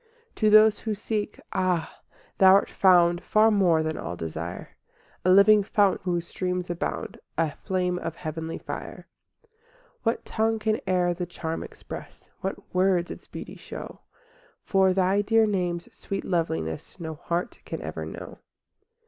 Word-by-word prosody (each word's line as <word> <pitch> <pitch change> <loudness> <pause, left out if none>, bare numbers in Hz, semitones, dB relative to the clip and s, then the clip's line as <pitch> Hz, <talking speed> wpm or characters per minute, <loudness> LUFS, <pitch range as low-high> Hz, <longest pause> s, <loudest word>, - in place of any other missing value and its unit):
IV - - -40
To 215 - +3
those 215 0 +7
who 220 -2 -2
seek, 210 0 -3
ah! 185 -3 0 0.4
Thou 190 -1 +8
art 200 - +2
found 175 -2 +4
Far 215 +3 +4
more 175 -6 +3
than 155 0 -2
all 85 - -4
desire— 80 +1 -5 0.5
A 185 - +2
living 200 +3 +7
fount 200 -1 +2
whose 175 -2 -1
streams 180 0 -3
abound, 175 - -4 0.2
A 160 -2 +1
flame 180 -2 -1
of 165 -2 -5
heavenly 160 +1 -5
fire. - - -7 0.4
V 460 - -32 0.5
What 230 0 -1
tongue 225 0 0
can 215 0 0
e'er 180 -1 +2
the 175 0 -4
charm 165 -1 -4
express? - - -10
What 190 - -6
words 180 -1 +2
its - - -10
beauty - - -8
show? - - -9 0.6
For 190 -1 +3
Thy 190 +2 +2
dear 225 +2 +4
name's 180 -4 -1
sweet 195 - -5
loveliness 80 - -2
No 160 -2 -5
heart 170 +7 -3
can - - -5
ever - - -5
know. - - -8
185 Hz, 155 wpm, -26 LUFS, 170-205 Hz, 0.6 s, Thou